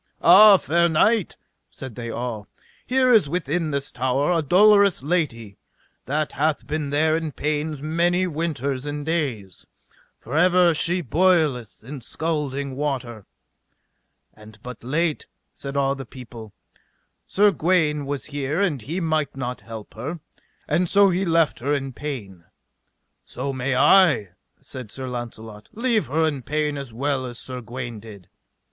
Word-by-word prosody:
Ah, 195 +3 +9
fair 170 +3 +1
knight, 205 +5 +2 0.3
said 130 -3 -9
they 115 +1 -6
all, 115 -3 -5 0.4
here 255 0 +3
is 205 -11 +4
within 165 0 -1
this 140 -1 -3
tower 130 +5 0
a 170 -2 +2
dolorous 200 +1 +4
lady 130 - -2 0.5
that 150 +2 -1
hath 155 +1 -1
been 150 -1 -3
there 155 +2 +2
in 160 -1 -3
pains 150 0 -3
many 175 +4 +1
winters 145 -5 -3
and 145 0 -4
days, 130 - -3 0.5
for 125 +6 -7
ever 180 +1 +4
she 175 +3 0
boileth 155 - +1
in 135 +3 -8
scalding 140 -1 -3
water; 125 -7 -4 1.1
and 110 0 -15
but 125 -2 -9
late, 155 +5 -1 0.3
said 140 0 -6
all 135 0 +2
the 135 -1 -7
people, 115 -3 -11 0.8
Sir 205 +1 +4
Gawaine 155 -5 +1
was 145 -1 -3
here 145 +2 -3
and 165 - 0
he 160 - -4
might 155 -5 -1
not 125 -1 -4
help 110 -2 -10
her, 145 +10 -6 0.5
and 175 -1 +1
so 200 -1 +5
he 185 +2 0
left 165 -3 +2
her 145 +4 0
in 135 -2 -4
pain. 105 - -7 0.8
So 135 +2 -5
may 130 0 -1
I, 150 - +5 0.3
said 130 -4 -9
Sir 130 +4 -7
Launcelot, 115 -3 -8
leave 230 -2 0
her 160 +4 +1
in 145 -4 -3
pain 150 +2 -1
as 140 -4 -6
well 135 +3 -1
as 120 -1 -8
Sir 125 0 -6
Gawaine 120 -1 -7
did. 100 -4 -13
145 Hz, 150 wpm, -23 LUFS, 125-165 Hz, 1.1 s, Ah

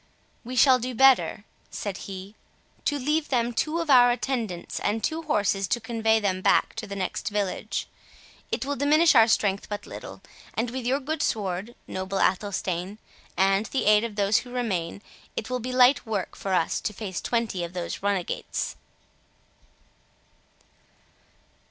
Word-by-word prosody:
"We 250 +2 -6
shall 255 0 +6
do 250 +1 -4
better," 265 -5 +4 0.3
said 200 -2 -5
he, 195 +1 -8 0.5
"to 290 - +1
leave 300 +3 0
them 240 -2 +1
two 310 +7 0
of 320 -3 -1
our 245 -2 +8
attendants 240 -7 -2
and 215 +2 -1
two 320 0 -1
horses 200 - 0
to 240 - 0
convey 225 -1 +1
them 190 -3 -1
back - - +3
to 220 -1 -4
the 200 - -6
next 190 +1 -3
village. 205 -2 -2 0.6
It - - -1
will 285 +1 -1
diminish 305 +4 +4
our 225 -4 +7
strength 200 -3 +1
but 205 -1 -5
little; - - -9 0.3
and 230 +1 -1
with 255 -1 -4
your 265 +3 +2
good 305 +2 -3
sword, 205 0 -2
noble 190 +1 -4
Athelstane, 190 -1 -1 0.4
and 195 +2 +3
the 270 - -1
aid 210 +1 +5
of 230 -3 -4
those 205 +1 +3
who 250 - -4
remain, 200 -7 -3 0.3
it 220 - -4
will 250 - 0
be 250 +2 -4
light 255 +2 +5
work 215 -5 -3
for 195 -1 -2
us 165 - 0
to 210 - -3
face 195 -3 -5
twenty 230 -7 -1
of 170 +1 -6
those 175 -1 -4
runagates." 200 -3 -2
220 Hz, 160 wpm, -26 LUFS, 195-255 Hz, 0.6 s, our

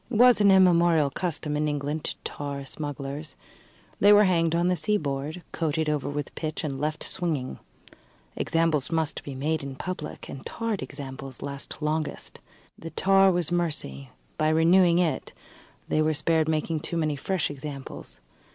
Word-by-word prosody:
It 250 - -4
was 245 0 +6
an 200 - +6
immemorial 170 -5 +5
custom 155 -4 -2
in 150 +1 +1
England 145 +1 -2
to - - -1
tar 140 -1 -5
smugglers. 145 0 -5 0.6
They 205 - +7
were 210 0 +8
hanged 170 -4 +2
on 170 +1 +2
the 180 - +3
seaboard, 155 -4 -1
coated 160 -1 -1
over 150 -2 -1
with 145 0 -4
pitch 155 0 -4
and 140 -3 -3
left 155 +1 -2
swinging. 155 -8 -3 0.8
Examples 165 -4 +1
must 160 -2 0
be 140 - -7
made 155 +4 -1
in 140 -1 -6
public, 165 0 -6
and 135 - -8
tarred 230 -3 -3
examples 135 -2 -7
last 140 +2 -6
longest. 155 0 -2 0.4
The 165 - -7
tar 195 +2 +4
was 175 -2 0
mercy: 150 - -2 0.3
by 155 0 +3
renewing 170 +2 +5
it 165 -6 0 0.5
they 155 - +2
were 155 0 +2
spared 160 +1 +2
making 155 0 0
too 165 +2 -4
many 155 -2 0
fresh 170 +3 -1
examples. 135 - -8
155 Hz, 160 wpm, -26 LUFS, 145-175 Hz, 0.8 s, were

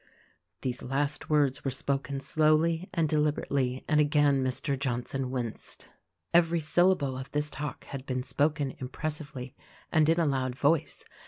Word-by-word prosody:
These 125 -2 -2
last 140 +3 -2
words 145 -3 +2
were 135 - 0
spoken 135 +1 -2
slowly 155 +4 +2
and 165 -4 +1
deliberately, 145 -4 0
and 150 - +3
again 145 -2 +3
Mr. 130 +2 0
Johnson 130 0 -2
winced. 125 -4 -3 0.4
Every 170 0 +4
syllable 160 -3 +2
of 130 +1 -6
this 150 +1 0
talk 145 +1 -5
had 140 -1 -7
been 130 -1 -1
spoken 140 +1 0
impressively 140 -1 -5 0.4
and 155 -2 +4
in 165 +1 +3
a 170 - +3
loud 130 -3 0
voice. 150 +3 +1
140 Hz, 145 wpm, -29 LUFS, 130-155 Hz, 0.4 s, Every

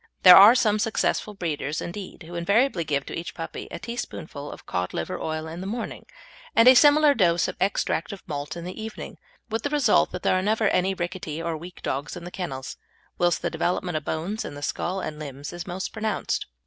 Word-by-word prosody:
There 180 -1 +11
are 205 +5 +10
some 215 -4 +2
successful 215 -1 0
breeders, 155 -5 -3
indeed, 185 0 -7
who 165 +2 -11
invariably 195 +3 +2
give 140 -3 -1
to - - -6
each 170 - -6
puppy 165 -1 -6
a - - -6
teaspoonful 160 -11 -6
of - - -11
cod 90 0 -3
liver 80 - -3
oil 155 0 -3
in 165 +2 -7
the 190 - -5
morning 230 +3 -5 0.5
and 230 - +6
a 255 - +11
similar 295 +2 +6
dose 175 -7 +3
of - - -4
extract 190 -3 0
of 200 - -9
malt 145 +1 -4
in 170 - -6
the 180 +4 -6
evening, 220 0 -7 0.3
with 225 - -1
the 285 - -2
result 285 -7 +3
that - - -5
there - - +3
are 185 - +2
never 215 +1 +2
any 185 +1 +1
rickety 175 -3 -4
or 165 0 -2
weak 175 +3 -10
dogs 140 +5 -3
in 175 - -9
the 175 - -8
kennels, 135 -9 -5 0.4
whilst 175 -1 +2
the - - 0
development 180 -1 -1
of 155 - -1
the - - -2
bones 180 +8 -3
in 145 - -7
the 145 - -8
skull 185 +5 -2
and 150 -3 -5
limbs 145 0 -7
is 175 +1 -7
most 185 +1 -4
pronounced. 220 -1 -2
180 Hz, 220 wpm, -25 LUFS, 160-210 Hz, 0.5 s, There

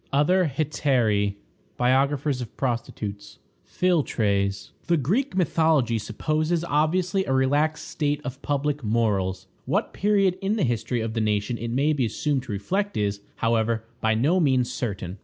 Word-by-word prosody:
Other 155 +4 +3
Hetairæ. 120 -10 +1 0.4
Biographers 135 +2 +1
of 120 - -8
Prostitutes. 105 -5 -4 0.3
Philtres. 100 - 0 0.2
The 170 - +3
Greek 190 - 0
mythology 160 -9 +2
supposes 155 +10 -1
obviously 170 +4 +1
a 135 - 0
relaxed 145 +4 +1
state 145 -1 -1
of 135 +1 -6
public 145 0 -1
morals. 100 -5 0 0.2
What - - -1
period 195 -2 +2
in 195 +2 0
the 215 - 0
history 120 -1 -1
of 110 0 -3
the 115 - -1
nation 105 +2 0
it 115 - -4
may 140 +6 +2
be 130 -5 +1
assumed 145 +3 -1
to 120 - -6
reflect 190 - -2
is, 100 -1 -1
however, 115 -1 +1 0.2
by 110 0 +2
no 150 +11 +2
means 130 -6 +2
certain. 100 -5 -4
130 Hz, 145 wpm, -25 LUFS, 110-155 Hz, 0.4 s, Other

